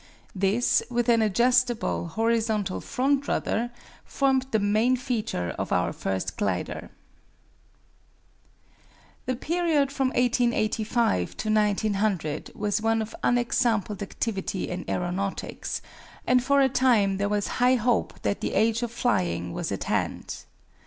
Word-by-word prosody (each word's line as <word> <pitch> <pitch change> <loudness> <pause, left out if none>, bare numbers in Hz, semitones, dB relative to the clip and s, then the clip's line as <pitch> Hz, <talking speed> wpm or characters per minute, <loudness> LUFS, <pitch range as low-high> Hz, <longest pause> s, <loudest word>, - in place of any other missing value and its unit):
This, 200 +5 +2
with 240 -1 0
an 230 -1 +5
adjustable, 240 -1 +2
horizontal 220 0 0
front 275 +2 0
rudder, 235 +2 0 0.3
formed 265 -1 +1
the 220 - +2
main 215 +5 +2
feature 225 - -2
of - - -3
our - - +1
first 95 0 -3
glider. 95 -3 -2 2.4
The 255 - 0
period 310 -1 +1
from 270 -1 0
1885 235 - +1
to 215 - -3
1900 205 -6 0
was 205 0 -1
one 225 0 +1
of 220 - -9
unexampled 235 -4 +1
activity 200 -1 -3
in 180 0 -5
aeronautics, 185 +2 -3 0.4
and 250 0 +3
for 280 +2 +3
a 270 - +5
time 230 -7 +3
there 200 +1 0
was 205 -1 0
high 250 +1 +5
hope 240 -1 0
that 200 - -1
the - - -2
age 225 +1 +2
of 240 -2 -2
flying 90 - 0
was - - -3
at - - -3
hand. - - -3
225 Hz, 125 wpm, -26 LUFS, 200-245 Hz, 2.4 s, an